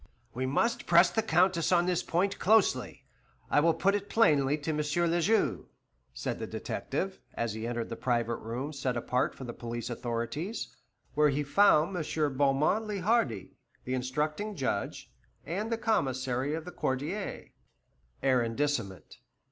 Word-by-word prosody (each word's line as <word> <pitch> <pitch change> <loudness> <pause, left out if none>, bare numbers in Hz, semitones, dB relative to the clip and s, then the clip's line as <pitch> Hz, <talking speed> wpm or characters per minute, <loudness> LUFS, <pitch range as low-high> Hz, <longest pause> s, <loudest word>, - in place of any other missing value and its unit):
"We 130 +2 -2
must 230 - 0
press 175 +1 +6
the 220 - +1
Countess 180 -3 +2
on 175 -1 +4
this 180 -1 +1
point 190 +4 0
closely; 190 - +2 0.5
I - - +5
will 165 +1 +3
put 195 +1 +2
it 205 0 -2
plainly 150 -10 +3
to 155 +1 -3
M. 150 - -2
le 170 +3 +1
Juge," 220 +7 +1 0.5
said - - -4
the - - -4
detective, 190 0 -4 0.2
as 115 -3 -2
he 110 +1 -4
entered 120 -1 -3
the 115 - -4
private 120 -2 0
room 125 +7 -5
set 130 -3 -2
apart 125 +2 0
for - - -9
the 120 -2 -6
police 120 +1 -5
authorities, 120 - -4 0.4
where 150 0 +4
he 145 +1 0
found 175 +2 +4
M. 155 -4 -1
Beaumont 145 +10 +2
le 205 -2 -3
Hardi, 170 - +1 0.3
the 125 - -2
instructing 150 +11 -2
judge, 130 - -3 0.3
and 205 +8 -3
the 230 - +1
Commissary 135 - 0
of 160 0 -6
the 180 - -7
Quartier 150 +11 -3 0.7
(arrondissement). 120 -4 0
150 Hz, 155 wpm, -30 LUFS, 125-185 Hz, 0.7 s, press